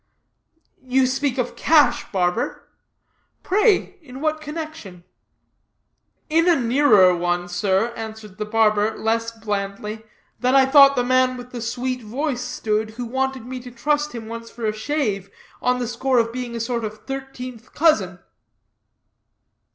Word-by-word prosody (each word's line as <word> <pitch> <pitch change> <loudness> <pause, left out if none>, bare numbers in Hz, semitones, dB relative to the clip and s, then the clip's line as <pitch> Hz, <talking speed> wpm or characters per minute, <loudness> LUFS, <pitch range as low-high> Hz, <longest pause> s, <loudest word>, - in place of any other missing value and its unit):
"You 260 0 +2
speak 265 +1 -1
of 250 -1 -2
cash, 310 -2 +3
barber; 185 +4 -1 0.8
pray 405 0 +2
in 260 -4 -11
what 310 +1 -1
connection?" 305 - -7 1.2
"In 330 +2 +3
a 345 - +6
nearer 230 -7 +5
one, 175 0 -1
sir," 190 +5 0
answered 220 -3 -8
the 210 - -2
barber, 215 0 +2
less 230 +1 0
blandly, 210 -1 -4 0.4
"than 255 +1 +2
I 270 -1 +7
thought 275 0 +7
the 245 - +1
man 255 0 +2
with 245 0 -10
the 240 - -6
sweet 250 +2 -3
voice 250 +4 -3
stood, 220 -3 -2
who 245 - -3
wanted 265 0 -2
me 255 +1 -6
to 250 0 -10
trust 295 +5 -1
him 230 -2 -7
once 230 0 -7
for 235 -1 -6
a 215 - 0
shave, 215 -5 -2 0.3
on 250 0 +2
the 245 -1 -2
score 255 +2 0
of 230 -1 +2
being 245 -1 -5
a - - -3
sort 235 0 -2
of 215 0 -7
thirteenth 255 -3 -7
cousin." 210 - +3
245 Hz, 150 wpm, -22 LUFS, 215-265 Hz, 1.2 s, I